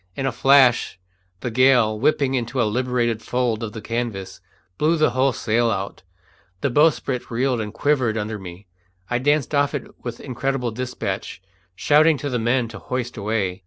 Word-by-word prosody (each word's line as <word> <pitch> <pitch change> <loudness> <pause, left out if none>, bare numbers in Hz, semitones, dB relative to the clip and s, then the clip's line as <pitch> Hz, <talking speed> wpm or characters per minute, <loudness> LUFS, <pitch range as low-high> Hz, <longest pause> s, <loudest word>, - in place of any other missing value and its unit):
In 135 - -3
a 135 - +1
flash 130 -4 +4 0.4
the 125 - -3
gale, 125 -3 +4
whipping 140 +1 +2
into 125 0 -2
a - - +4
liberated 120 0 0
fold 120 -3 -1
of 110 -2 -5
the 110 - -8
canvas, 115 -5 -4 0.4
blew 160 +3 +3
the 155 -4 +3
whole 130 +2 +2
sail 115 0 +1
out; 100 -2 -3 0.6
the 140 - 0
bowsprit 140 -3 +1
reeled 125 0 0
and 105 -1 -5
quivered 125 -2 +1
under 105 0 -3
me; 90 +1 -10 0.5
I 120 - +1
danced 145 +1 +1
off 145 +1 +2
it 140 - -4 0.2
with 120 -1 -6
incredible 130 -2 -2
despatch, 110 -5 -4 0.4
shouting 155 - +4
to 145 0 -4
the 125 - 0
men 120 +1 +1
to 110 - -9
hoist 125 -1 -4
away. 100 -4 -2
120 Hz, 170 wpm, -22 LUFS, 110-135 Hz, 0.6 s, flash